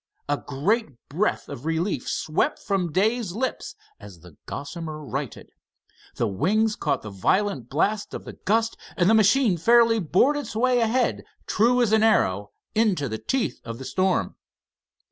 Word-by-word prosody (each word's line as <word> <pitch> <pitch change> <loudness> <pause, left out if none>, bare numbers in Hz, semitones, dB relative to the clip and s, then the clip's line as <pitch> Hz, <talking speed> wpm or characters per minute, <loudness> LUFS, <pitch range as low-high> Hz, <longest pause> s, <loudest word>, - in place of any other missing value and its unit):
A 145 - +1
great 150 - -1
breath 180 +9 -1
of 120 - -8
relief 165 -2 -1
swept 155 - 0
from 185 -4 -2
Dave's 205 +1 0
lips 260 - -3 0.2
as 90 -5 -13
the 85 -2 -15
Gossamer 155 +2 -6
righted. 135 -2 -5 0.6
The 115 - 0
wings 210 - +1
caught - - -1
the 105 - -7
violent 135 - 0
blast 205 +9 -1
of - - -7
the - - -8
gust, 225 +2 0 0.2
and 175 - +3
the 220 - +5
machine 220 -1 +4
fairly 230 +5 +4
bored 205 - +2
its 290 - -6
way 250 +2 +2
ahead, 240 +2 +1 0.2
true 245 +3 +3
as 220 - +1
an 220 0 +4
arrow, 105 - +2 0.2
into 205 -10 +1
the 110 -2 -4
teeth 265 -3 -2
of 115 0 -6
the 130 - -8
storm. 185 +3 0
195 Hz, 160 wpm, -24 LUFS, 145-225 Hz, 0.6 s, the